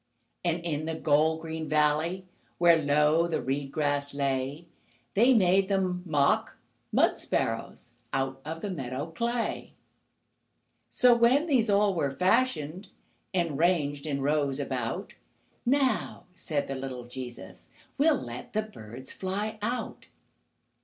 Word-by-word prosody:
And 170 Hz, -1 st, 0 dB
in 155 Hz, -2 st, -2 dB
the 160 Hz, 0 st, -2 dB
gold 160 Hz, +1 st, +2 dB
green 160 Hz, -1 st, -5 dB
valley, 155 Hz, +5 st, +1 dB, 0.3 s
Where 170 Hz, -2 st, +5 dB
low 150 Hz, +3 st, +3 dB
the 165 Hz, -, -1 dB
reed 135 Hz, +1 st, -2 dB
grass 145 Hz, -1 st, -1 dB
lay, 140 Hz, +3 st, -1 dB, 0.5 s
They 240 Hz, +6 st, +5 dB
made 190 Hz, -1 st, +4 dB
them 185 Hz, -2 st, 0 dB
mock 145 Hz, -3 st, +2 dB, 0.3 s
mud -, -, +3 dB
sparrows 115 Hz, +1 st, -2 dB, 0.2 s
Out 135 Hz, 0 st, -2 dB
of 160 Hz, +3 st, -6 dB
the 205 Hz, -, -3 dB
meadow 140 Hz, 0 st, -4 dB
clay. 235 Hz, +6 st, -2 dB, 1.2 s
So, 250 Hz, -2 st, +5 dB
when 245 Hz, +6 st, +4 dB
these 255 Hz, -9 st, +2 dB
all 200 Hz, 0 st, +3 dB
were 155 Hz, -6 st, 0 dB
fashioned, 180 Hz, -, +1 dB, 0.4 s
And 170 Hz, -6 st, -1 dB
ranged 155 Hz, -4 st, +1 dB
in 140 Hz, -2 st, -1 dB
rows 145 Hz, -1 st, +1 dB
about, 135 Hz, -, -3 dB, 0.5 s
"Now," 265 Hz, -7 st, +1 dB
said 155 Hz, -5 st, -2 dB
the 135 Hz, -, -4 dB
little 130 Hz, -2 st, -5 dB
Jesus, 120 Hz, -5 st, -9 dB, 0.3 s
"We'll 295 Hz, -1 st, +4 dB
let 120 Hz, 0 st, -8 dB
the 215 Hz, 0 st, +1 dB
birds 130 Hz, -, -10 dB
fly 205 Hz, +3 st, -3 dB
out." 240 Hz, +4 st, -3 dB
160 Hz, 130 wpm, -28 LUFS, 140-190 Hz, 1.2 s, Where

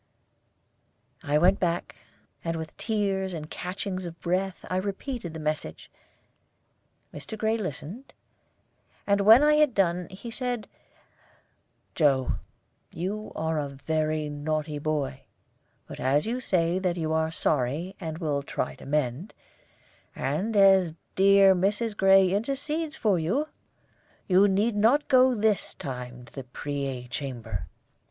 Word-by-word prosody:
I 145 Hz, +1 st, +1 dB
went 180 Hz, +5 st, +4 dB
back, 175 Hz, -1 st, -1 dB, 0.5 s
and 165 Hz, 0 st, -2 dB
with 160 Hz, -1 st, -6 dB
tears 195 Hz, -4 st, -1 dB
and 155 Hz, -1 st, -6 dB
catchings 185 Hz, 0 st, -4 dB
of 165 Hz, -, -8 dB
the -, -, -41 dB
breath 185 Hz, +2 st, -1 dB
I 185 Hz, -, -1 dB
repeated 200 Hz, -, -4 dB
the -, -, -5 dB
message. 155 Hz, 0 st, -4 dB, 1.2 s
Mr. 220 Hz, -, -7 dB
Gray 220 Hz, +1 st, +1 dB
listened; 200 Hz, -, -6 dB, 0.9 s
and 200 Hz, 0 st, +2 dB
when 220 Hz, +7 st, +8 dB
I 300 Hz, 0 st, +5 dB
had 300 Hz, -5 st, +3 dB
done, 180 Hz, -2 st, +1 dB
he 195 Hz, +5 st, -9 dB
said: 245 Hz, -2 st, -3 dB, 1.3 s
"Joe, 140 Hz, -5 st, +2 dB, 0.5 s
you 205 Hz, +5 st, -4 dB
are 160 Hz, 0 st, -1 dB
a 145 Hz, -1 st, -3 dB
very 155 Hz, +2 st, -1 dB
naughty 150 Hz, +1 st, -3 dB
boy; 145 Hz, -3 st, -2 dB, 0.6 s
but -, -, -10 dB
as 140 Hz, +3 st, +2 dB
you 240 Hz, +3 st, -2 dB
say 180 Hz, -6 st, +1 dB
that 180 Hz, -2 st, -1 dB
you 160 Hz, -1 st, -1 dB
are 160 Hz, 0 st, +1 dB
sorry, 155 Hz, +4 st, -1 dB
and 160 Hz, -3 st, -5 dB
will 150 Hz, -4 st, -1 dB
try 140 Hz, -, -3 dB
to -, -, -12 dB
mend, 145 Hz, -, -1 dB, 0.8 s
and 175 Hz, +12 st, -1 dB
as 190 Hz, -4 st, +5 dB, 0.2 s
dear 195 Hz, 0 st, +6 dB
Mrs. 205 Hz, +4 st, 0 dB
Gray 195 Hz, -1 st, +5 dB
intercedes 290 Hz, +8 st, -2 dB
for 205 Hz, -6 st, +2 dB
you, 245 Hz, -, 0 dB, 0.8 s
you 190 Hz, +2 st, +5 dB
need 205 Hz, +3 st, +1 dB
not 235 Hz, +8 st, +3 dB
go 255 Hz, -1 st, +5 dB
this 215 Hz, -3 st, 0 dB
time 125 Hz, -2 st, -7 dB
to -, -, -19 dB
the 135 Hz, -, -6 dB
Preay 135 Hz, -1 st, -4 dB
Chamber. 120 Hz, -, -5 dB
180 Hz, 135 wpm, -27 LUFS, 150-205 Hz, 1.3 s, when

